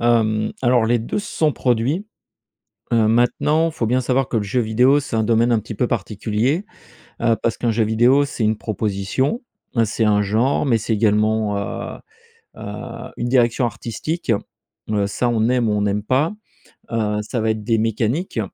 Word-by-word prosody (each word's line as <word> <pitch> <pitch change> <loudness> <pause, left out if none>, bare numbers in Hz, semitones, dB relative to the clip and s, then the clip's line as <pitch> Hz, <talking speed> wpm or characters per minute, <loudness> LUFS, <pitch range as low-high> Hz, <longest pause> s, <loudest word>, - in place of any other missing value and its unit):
Hem, 110 -2 +2
alors 120 -2 +3
les 120 +1 +2
2 115 - -3
se 205 - -5
sont 155 -2 +3
produits. 130 - 0 0.9
Heu, 110 -2 +4
maintenant, 150 +8 +2
faut 140 -8 -2
bien 125 +3 +2
savoir 130 +1 0
que 115 - -2
le 110 - +1
jeu 105 +5 0
vidéo, 125 +6 +3
c'est 135 -5 -4
un 110 - +2
domaine 115 +2 +3
un 115 - +3
petit 110 +1 -8
peu 125 - 0
particulier. 115 - -1 0.6
Heu, 115 -1 +3
parce 115 - 0
qu'un 120 - 0
jeu 110 0 +1
vidéo, 120 +6 +4
c'est 125 -4 -3
une 110 +1 +2
proposition, 105 - -2 0.4
c'est 110 +1 -1
un 105 -1 +3
genre, 115 +9 +1
mais 120 -4 +3
c'est 110 +2 -3
également, 105 0 +2
heu, 100 - -5 0.6
heu, 115 +4 -7
une 120 - -2
direction 120 -1 +2
artistique, 120 +6 -3 0.6
heu, 105 -2 +1
ça 120 +4 -1
on 115 -1 +1
aime 125 -2 +2
ou 105 - +1
on 105 - +1
n'aime 105 0 0
pas. 135 - +1 0.6
Heu, 105 -2 0
ça 120 +3 -3
va 110 0 +1
être 110 -1 -2
des 115 -1 +1
mécaniques 115 - -1
115 Hz, 180 wpm, -20 LUFS, 110-125 Hz, 0.9 s, Heu